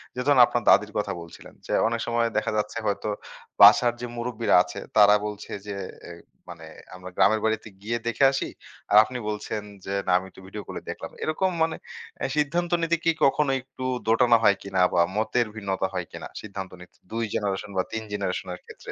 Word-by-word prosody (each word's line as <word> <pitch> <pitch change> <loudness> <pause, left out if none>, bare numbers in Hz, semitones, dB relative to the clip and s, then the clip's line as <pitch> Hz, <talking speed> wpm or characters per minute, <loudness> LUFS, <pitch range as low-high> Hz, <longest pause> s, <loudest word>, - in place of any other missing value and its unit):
যে, - - -5
ধরেন 140 -3 +6
আপনার 120 - -2
দাদীর 105 0 +5
কথা 105 -1 -1
বলছিলেন, 85 - -13 0.3
অনেক 115 0 -2
সময় 115 0 +1
দেখা 110 - 0
যাচ্ছে 105 +1 -2
হয়তো 100 +1 -1 0.5
বাসার 120 -1 +8
যে, 120 - -3
মুরুব্বিরা 120 -1 0
আছে 100 - -8 0.2
তারা 105 0 +8
বলছে 105 -1 -7 0.2
যে, 100 - -4 0.3
এই 85 0 -10 0.3
মানে 85 -2 -10 0.3
আমরা 90 0 -9
গ্রামের 110 +1 +3
বাড়িতে 110 0 -1
গিয়ে 115 +3 -2
দেখে 120 +3 +1
আসি। 135 - -2 0.4
আর 105 - +7
আপনি 125 +2 -6
বলছেন 105 0 -4 0.2
যে, 100 - -4
না - - +2
আমি 95 - -4
একটু 95 - -16
ভিডিও 105 +2 -7
কলে - - -6
দেখলাম। - - -6
এরকম 170 +4 0
মানে 160 -1 0 0.4
এ্যা 135 - -2
সিদ্ধান্ত 170 +4 0
নিতে 165 0 +1
কি 165 - +4
কখনো 140 +1 +2
একটু 130 0 -9 0.2
দোটানো 120 +1 +5
হয় 100 -3 +5
কিনা 95 -2 -1
বা 85 - +4
মতের 110 +2 +1
ভিন্নতা 95 -3 -2
হয় 90 -1 -2
কিনা? - - -8
সিদ্ধান্ত 100 -3 -7
নিতে 90 - -16
২ 115 +1 -2
জেনারেশন 100 -1 -2
বা 95 - +3
৩ 110 - -3
জেনারেশন 100 -3 -3
এর - - -16
ক্ষেত্রে। - - -10
110 Hz, 195 wpm, -25 LUFS, 100-120 Hz, 0.5 s, বাসার